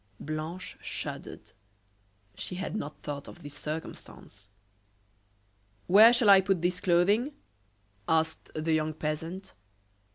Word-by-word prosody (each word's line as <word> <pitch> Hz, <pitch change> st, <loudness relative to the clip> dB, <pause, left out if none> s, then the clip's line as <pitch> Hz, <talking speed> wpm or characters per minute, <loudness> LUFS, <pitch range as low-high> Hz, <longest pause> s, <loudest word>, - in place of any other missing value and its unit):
Blanche 155 Hz, +4 st, -5 dB
shuddered. -, -, -7 dB, 0.8 s
She 180 Hz, -, -5 dB
had 190 Hz, +3 st, -4 dB
not 150 Hz, -8 st, -6 dB
thought 145 Hz, -1 st, -5 dB
of 175 Hz, -, -12 dB
this 145 Hz, -1 st, -8 dB
circumstance. 145 Hz, -9 st, -8 dB, 1.4 s
"Where 215 Hz, +5 st, +8 dB
shall 235 Hz, -4 st, +5 dB
I 195 Hz, -1 st, +8 dB
put 190 Hz, -3 st, 0 dB
this 180 Hz, +1 st, 0 dB
clothing?" 200 Hz, -, +3 dB, 0.7 s
asked 160 Hz, 0 st, 0 dB
the 160 Hz, +1 st, 0 dB
young 155 Hz, 0 st, 0 dB
peasant. 165 Hz, +5 st, -4 dB
170 Hz, 110 wpm, -29 LUFS, 155-190 Hz, 1.4 s, Where